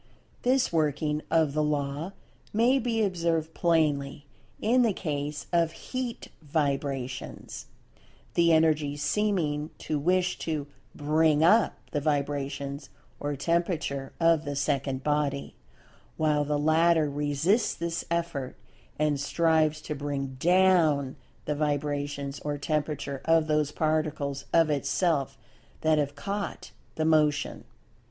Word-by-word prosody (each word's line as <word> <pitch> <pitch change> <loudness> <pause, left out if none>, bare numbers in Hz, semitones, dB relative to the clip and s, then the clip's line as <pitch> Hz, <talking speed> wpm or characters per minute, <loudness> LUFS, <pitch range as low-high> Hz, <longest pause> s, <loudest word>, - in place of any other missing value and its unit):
This 255 -4 +2
working 150 -1 0
of 160 -3 +2
the 155 - +1
law 150 +4 -2 0.4
may 240 +5 +3
be 230 -2 0
observed 165 -4 0
plainly 145 -4 +1 0.3
in 245 +4 +3
the 230 -4 +3
case 145 -4 -3
of 165 -1 +2
Heat 255 +2 -5
vibrations—the 140 +3 -3
Energy 155 -3 +3
seeming 155 -2 0
to 155 -2 -2
wish 180 +3 +1
to 155 -3 -2 0.3
"bring 155 +1 +2
up" 210 +6 +5 0.2
the 145 - -1
vibrations 140 -1 -2 0.3
or 145 0 -2
temperature 160 -3 -1
of 165 -2 +4
the 145 -2 -4
second 140 -2 -1
body, 145 -2 -1 0.6
while 150 -2 +2
the 150 0 0
latter 160 +1 +3
resists 145 - +1
this 170 0 -3
effort, 165 -6 -2 0.4
and 150 -2 +1
strives 155 +1 +2
to 155 - -4
"bring 140 -2 -4
down" 170 -6 +3 0.3
the 150 - 0
vibrations 145 -1 -2
or 145 -1 -3
temperature 145 -2 -2
of 165 -1 +4
those 150 -1 +1
Particles 155 -3 -1
of 165 -2 +4
itself 140 -1 0 0.4
that 155 -1 +3
have 145 -1 -1
"caught 200 +7 -4 0.2
the 160 - 0
Motion." 150 -2 +2
150 Hz, 115 wpm, -28 LUFS, 145-165 Hz, 0.6 s, up